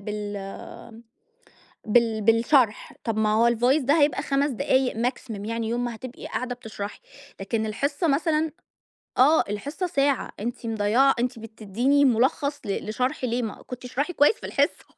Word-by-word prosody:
بال 205 +1 -7 0.9
بال 225 -1 +3
بالشرح." 230 +1 +3
طب 225 -2 -2
ما 215 -1 +2
هو 230 +2 +4
الvoice 245 +6 +2
ده 285 +5 +3
هيبقى 290 +1 +2
5 280 +1 +1
دقايق 260 +2 +1
maximum 225 -3 -3
يعني، 230 0 -2
يوم 240 +1 -1
ما 235 -1 -4
هتبقي 255 +3 -9
قاعدة 250 -1 -3
بتشرحي، 210 -4 -7 0.4
لكن 215 +3 -2
الحصة 280 - -1
مثلًا 310 +1 +1 0.7
آه، 295 +5 +6
الحصة 285 - -3
ساعة. 280 -4 0
أنتِ 235 +3 -5
مضَيِّعة 225 +5 +3
أنتِ 245 0 -1
بتديني 225 +6 +1
مُلخَّص 275 +4 +1
ل 200 +1 -3
لشرح، 255 +6 -2
ليه 245 0 0
ما 220 - -6
كُنتِ 250 0 -8
اشرحي 285 +7 -2
كويِس 295 +7 +4
في - - -10
الحصة. - - 0
245 Hz, 150 wpm, -25 LUFS, 220-275 Hz, 0.9 s, آه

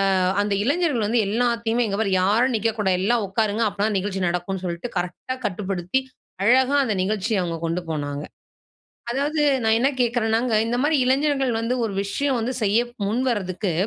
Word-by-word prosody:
அ - - +2 0.3
அந்த 205 0 -1
இளைஞர்கள் 285 -3 +1
வந்து 235 +2 +2
எல்லாத்தையுமே, 235 +1 +1
"இங்க 200 -1 -2
பார் 200 -3 0
யாரும் 230 +7 +2
நிற்கக்கூடாது. 210 -4 0
எல்லாம் 230 +1 +2
உட்காருங்க. 215 +3 0
அப்ப 200 0 -16
தான் 215 -2 +1
நிகழ்ச்சி 190 0 -3
நடக்கும்ன்னு" 180 +2 -2
சொல்லிட்டு 175 +6 -4
கரெக்டா 180 +8 -3
கட்டுப்படுத்தி 195 +3 -1 0.4
அழகா 260 +5 +4
அந்த 215 -4 -1
நிகழ்ச்சியை 205 +1 0
அவங்க 170 -1 -3
கொண்டு 165 +2 -2
போனாங்க. 145 -1 -3 0.9
அதாவது 290 +4 0 0.2
நான் 220 0 +3
என்ன 265 - +4
கேட்கிறன்னாங்க 235 -1 +1
இந்த 235 +1 -1
மாரி 300 +2 +3
இளைஞர்கள் 270 0 +1
வந்து 230 +2 -1
ஒரு 220 - -2
விஷயம் 265 +6 -1
வந்து 235 +3 -2
செய்ய 210 +2 +3 0.3
முன்வரதுக்கு 205 -5 -1
220 Hz, 160 wpm, -23 LUFS, 195-245 Hz, 0.9 s, அழகா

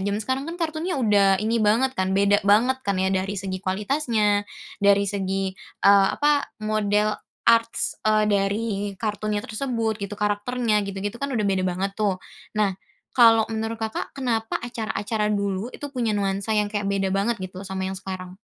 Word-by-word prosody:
zaman 205 +1 -1
sekarang 265 +1 -1
kan 340 - -5
kartunnya 325 0 -2
udah 200 -4 +4
ini 230 +1 +1
banget 230 +5 +3
kan, 190 0 0
beda 200 +1 +4
banget 240 +6 +4
kan 200 -1 0
ya 190 0 +1
dari 190 +2 -1
segi 190 -1 -3
kualitasnya, 210 0 0 0.3
dari 200 0 +4
segi, 195 -1 -2 0.3
eee, 200 -1 +7
apa, 290 -1 +2 0.2
model 215 0 +1 0.3
arts, 230 0 +2
eee, 215 0 +3
dari 200 +2 +1 0.3
kartunnya 210 0 -2
tersebut 230 -2 -2
gitu, 200 +1 -5
karakternya 210 +2 0
gitu-gitu 200 +5 -5
kan 280 - -1
udah 215 - 0
beda 190 -2 +1
banget 190 +2 -2
tuh. 200 -3 0 0.4
Nah 205 -2 +2 0.4
kalau 225 -2 +6
menurut, 225 +1 -2
Kakak, 220 0 -3
kenapa 230 -4 -1
acara-acara 220 -2 -2
dulu 200 +1 -1
itu 290 - -10
punya 230 -5 0
nuansa 200 +2 -1
yang 210 0 0
kayak 205 -1 -1
beda 195 -1 0
banget 205 +4 +1
gitu 185 0 -8
loh 195 - -8
sama 190 0 -3
yang 190 - -2
sekarang? 185 -1 -7
210 Hz, 170 wpm, -24 LUFS, 195-230 Hz, 0.4 s, eee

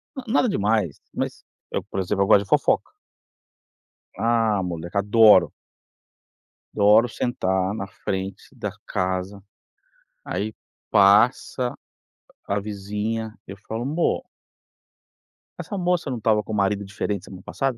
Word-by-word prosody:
na-nada 255 -1 +1
demais, 105 - 0
mas - - -4 0.3
eu, - - -2
por - - -5
exemplo, 100 +1 0
eu - - -1
gosto 100 - +6
de 100 - -17
fofoca. - - +2 1.3
Ah, 115 -3 +2
moleque, 85 +1 -5
adoro. 105 -2 +6 1.2
Adoro 105 +4 +5
sentar 95 -6 -1
na 100 - -4
frente 95 0 -5
da 105 -5 -4 0.2
casa, 95 0 -2 0.8
aí 110 +1 -3 0.4
passa 120 +5 +4 0.7
a 100 +1 0
vizinha, 105 +2 -4
eu 100 - -7
falo: 110 +4 -5
"Mô" 155 +5 0 1.4
"essa 200 - -5
moça 180 -4 0
não 125 -3 -3
tava 105 -1 +2
com 105 - -8
o - - -1
marido 100 0 +1
diferente 100 -1 -3
semana 95 -1 -11
passada?" 135 -3 -2
105 Hz, 120 wpm, -23 LUFS, 95-115 Hz, 1.4 s, gosto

